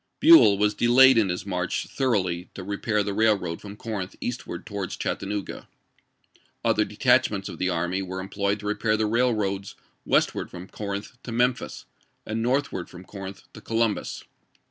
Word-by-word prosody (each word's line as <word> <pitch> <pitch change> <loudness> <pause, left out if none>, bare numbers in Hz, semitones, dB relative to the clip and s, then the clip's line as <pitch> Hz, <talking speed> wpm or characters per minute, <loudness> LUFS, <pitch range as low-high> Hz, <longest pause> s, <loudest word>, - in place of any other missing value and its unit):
Buell 315 - +8
was 105 +1 +2
delayed 125 +4 +6
in 110 -4 +3
his 90 +1 -3
march 90 -2 -2
thoroughly 95 -9 -1
to 95 - -6
rejiair 105 +1 -1
the 100 - -2
railroad 100 -6 +1
from 100 0 -9
Corinth 105 -3 -5
eastward 120 -7 -5
towards 100 -4 -5
Chattanooga. 100 0 -4 1.0
Other 105 - +3
detachments 110 -3 +2
of - - -8
the 95 - +1
army 90 +2 -1
were 95 0 -5
employed 100 +1 -2
to - - -9
repair 105 +1 +1
the 110 - 0
raih^oads 105 -4 0 0.3
westward - - +1
from 90 +1 -9
Corinth 100 +5 -6
to 120 - -7
Memphis, 120 +1 0 0.4
and 110 +1 -2
northward 125 -7 -1
from 90 0 -11
Corinth 95 0 -9
to 105 - -11
Columbus. 115 -1 -1
105 Hz, 155 wpm, -25 LUFS, 95-115 Hz, 1.0 s, Buell